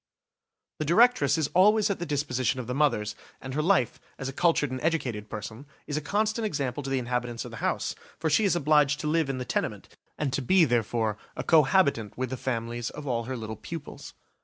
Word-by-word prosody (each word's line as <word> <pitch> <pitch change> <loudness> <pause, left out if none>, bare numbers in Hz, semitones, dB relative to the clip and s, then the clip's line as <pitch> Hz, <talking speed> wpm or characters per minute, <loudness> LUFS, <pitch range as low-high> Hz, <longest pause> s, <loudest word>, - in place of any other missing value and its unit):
The 155 - -1
directress 175 - +4
is 155 -3 0
always 210 +3 +5
at 200 - -3
the 175 - -4
disposition 130 -3 0
of 125 - -4
the 125 - -3
mothers, 120 -7 +1 0.3
and 130 0 -7
her 150 - 0
life, 170 - +2 0.2
as 135 - -5
a 135 - -4
cultured 165 -4 +2
and 130 0 -4
educated 125 -10 -1
person, 110 +6 -7 0.2
is 145 - -4
a 155 - -1
constant 215 +7 0
example 140 - -2
to 135 - -5
the 135 - +1
inhabitants 125 -1 -2
of - - -8
the - - -8
house, - - -1 0.2
for 160 - -2
she 160 +8 +3
is 195 -3 +3
obliged 150 -2 +3
to 150 - -3
live 160 -2 +1
in 135 - -2
the 125 - -4
tenement - - -3 0.3
and 140 -4 -2
to 140 - 0
be 175 +7 +5
therefore 115 -3 0 0.2
a - - -4
co 160 -2 +6
habitant 135 - +1
with 130 0 -2
the - - -1
families 120 -2 -3
of 150 - -9
all 120 -4 -1
her 130 +1 -4
little 110 -1 -6
pupils. 155 +7 -8
140 Hz, 220 wpm, -27 LUFS, 120-160 Hz, 0.3 s, co